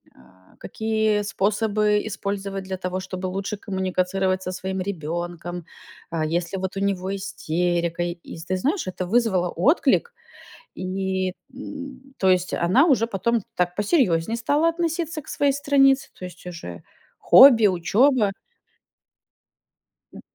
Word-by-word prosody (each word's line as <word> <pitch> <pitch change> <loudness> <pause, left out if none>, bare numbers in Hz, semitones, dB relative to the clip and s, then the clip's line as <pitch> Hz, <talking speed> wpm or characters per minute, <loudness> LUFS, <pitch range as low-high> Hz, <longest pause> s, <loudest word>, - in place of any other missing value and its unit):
а, 95 +9 -23
какие 220 0 0
способы 210 +1 +1
использовать 200 -1 -4
для 190 0 -5
того, 185 0 -3
чтобы 185 0 -5
лучше 195 +3 -4
коммуницировать 190 -1 -1
со 185 - -4
своим 190 +1 -4
ребенком, 175 -1 -5 0.5
э, 165 - -1
если 170 +4 -2
вот 190 0 -4
у - - -1
него 195 -1 -1
истерика. 175 -2 -1
И 175 -1 -6
с, 160 - -9
ты 185 - -1
знаешь, 295 - -1
это 185 0 -4
вызвало 190 -4 +1
отклик, 300 - +2 0.6
и 190 0 -2 0.2
н 270 0 -8 0.2
то 190 - +2
есть, 185 -1 +2
она 190 - +3
уже 265 -8 +3
потом 230 +1 0
так 180 0 0
посерьезнее 205 - +1
стала 290 +8 +2
относиться 330 -1 -2
к - - -24
своей 285 -1 +1
странице, 275 -1 +3
то - - -11
есть 180 0 -12
уже 90 - -8 0.4
хобби, 240 -5 +8
учеба. 205 +5 +3 1.8
Д - - -11
195 Hz, 135 wpm, -23 LUFS, 180-230 Hz, 1.8 s, хобби